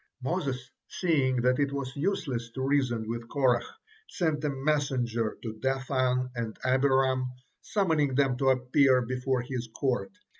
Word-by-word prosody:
Moses, 135 -5 -2 0.2
seeing 135 -8 +1
that 125 +1 +3
is 140 -1 +1
was 140 -2 -4
useless 140 -8 -2
to 130 - -2
reason 125 -6 +1
with 115 0 -5
Korah, 130 -4 +3 0.5
sent 160 -4 -1
a 150 - +1
messenger 135 -5 0
to 110 -2 -4
Dathan 130 -1 0
and 115 -3 -4
Abiram, 130 0 +3 0.3
summoning 160 -9 +1
them 135 -2 +3
to 135 0 +2
appear 130 0 +4
before 130 0 -1
his 125 -1 -4
court. 130 -3 0
130 Hz, 140 wpm, -28 LUFS, 125-140 Hz, 0.5 s, appear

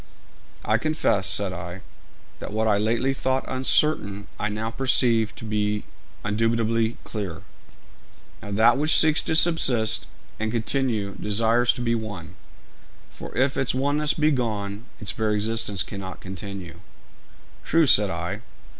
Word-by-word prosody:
'I - - +2
confess,' 155 - +1
said 100 -2 +1
I, 90 +1 -7 0.6
'that - - -7
what 110 +1 0
I 105 -2 +3
lately 120 +5 +1
thought 130 0 -1
uncertain, 130 -6 +1
I 105 - -1
now 110 +2 -3
perceive 120 -3 +2
to - - -9
be 105 -1 -1 0.4
indubitably 115 +1 +1
clear.' 100 -7 -6 1.0
'Now, - - -8
that 110 +5 +4
which 155 +2 +4
seeks 155 0 +5
to 160 - -1
subsist 145 -9 +3 0.3
and 110 0 -1
continue 115 -3 -1
desires 115 +3 +2
to - - -6
be 115 -1 +1
one; 105 -6 -5 0.8
for - - -9
if 130 +2 +2
its 130 -1 0
oneness 145 +3 +1
be 155 0 +2
gone, 105 -4 -2
its 105 - -1
very 110 -1 0
existence 105 -3 0
cannot 95 -2 -7
continue.' 95 -2 -8 0.8
'True,' 165 0 +3
said 105 -7 +5
I. 90 +3 -4
110 Hz, 135 wpm, -24 LUFS, 100-130 Hz, 1.0 s, seeks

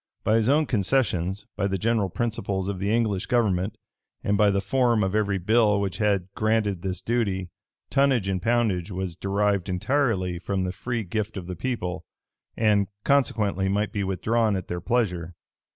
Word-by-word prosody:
By 110 +2 +3
his 115 +2 +2
own 150 +2 +4
concessions, 100 - 0
by 100 - 0
the 95 -1 -1
general 110 0 +1
principles 100 -3 -2
of 100 -2 -3
the 100 +2 -1
English 110 -4 0
government, 105 -3 +1 0.5
and 100 - +1
by 105 0 +4
the 100 0 +1
form 115 +2 +2
of 95 0 -1
every 105 -2 +1
bill 105 +2 +3
which 95 -3 -3
had 100 -4 +1
granted 105 -4 0
this 95 0 -3
duty, 100 -7 -1 0.4
tonnage 135 -7 +3
and 95 -2 -1
poundage 110 -6 +1
was 95 -2 -4
derived 100 0 0
entirely 95 -3 0
from 95 +1 -2
the 90 - -1
free 115 +5 -3
gift 105 +2 -3
of 90 - -5
the 90 0 -5
people; 90 -7 -3 0.5
and, 105 -3 +3 0.2
consequently, 105 -8 +1
might 105 +2 0
be 100 - -2
withdrawn 105 +3 +1
at 95 - -5
their 90 0 -3
pleasure. 90 -6 -1
100 Hz, 170 wpm, -25 LUFS, 95-115 Hz, 0.5 s, own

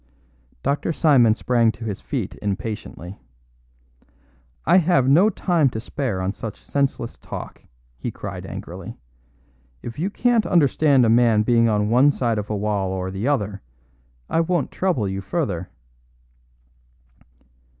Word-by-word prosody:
Dr. 145 +4 0
Simon 125 -9 +4
sprang 115 -1 +2
to 115 - -9
his 105 -3 -4
feet - - -4
impatiently. 100 -2 -5 1.5
"I - - +5
have 160 -7 +3
no 170 +10 +5
time 175 -7 +1
to 110 - -5
spare 120 -5 -3
on 95 +2 -1
such 110 -2 -7
senseless 135 -4 -2
talk," - - -8 0.4
he - - -3
cried - - -7
angrily. - - -8 0.9
"If 115 +4 -7
you 180 +5 0
can't 235 +1 +1
understand 145 -5 +4
a - - +3
man 115 -2 +4
being 115 0 +3
on 105 -1 +1
one 130 +5 +5
side 120 -5 -1
of 105 - -6
a 105 - -1
wall 100 -2 -1
or 95 0 -3
the 100 +6 -3
other, 105 -8 -1 0.7
I - - 0
won't 165 -4 -1
trouble 175 - 0
you 95 0 -3
further." 95 - -3
120 Hz, 140 wpm, -22 LUFS, 105-145 Hz, 1.5 s, I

